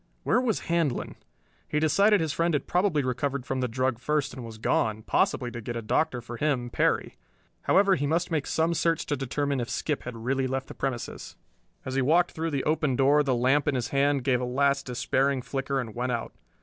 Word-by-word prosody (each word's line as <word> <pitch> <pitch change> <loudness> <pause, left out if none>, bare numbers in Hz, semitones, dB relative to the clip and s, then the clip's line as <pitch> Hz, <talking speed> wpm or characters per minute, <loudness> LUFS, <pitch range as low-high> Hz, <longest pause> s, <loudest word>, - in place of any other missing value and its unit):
Where 245 - +2
was 235 -5 0
Handlon? 165 -6 -1 0.5
He 150 - 0
decided 200 +6 +4
his 160 -3 -1
friend 165 +2 +1
had 145 - -1
probably 180 -5 +1
recovered 130 +1 -2
from 130 0 -2
the 125 - 0
drug 130 0 -1
first 150 +1 -1
and 130 - -7
was 115 -1 -9
gone, 110 0 0
possibly 120 +2 +1
to 120 - -6
get 120 +2 -5
a 115 - -3
doctor 125 +3 0
for 120 0 -8
him, 130 -5 -1
Perry. - - 0 0.5
However, 195 0 +4
he 145 -5 0
must 170 +4 0
make 155 -4 -1
some 165 +1 +1
search 165 -1 +1
to 145 - -1
determine 140 +1 -1
if 120 0 -3
Skip 150 +2 -2
had 120 -2 -7
really 130 +3 -1
left 130 +1 -3
the - - -7
premises. 130 -3 -4 0.5
As 130 - -4
he 135 - +1
walked 165 +7 +3
through 165 +1 -3
the 140 -4 -1
open 155 -3 +1
door 140 +3 +4
the 135 -3 +1
lamp 130 +5 +2
in 145 - +2
his 120 -3 -2
hand 140 0 +2
gave 125 -2 +2
a - - -2
last 140 +2 +1
despairing 130 +2 0
flicker 135 +1 -2
and 115 -4 -5
went 125 +2 -2
out. 120 -1 -3
135 Hz, 215 wpm, -27 LUFS, 125-150 Hz, 0.5 s, decided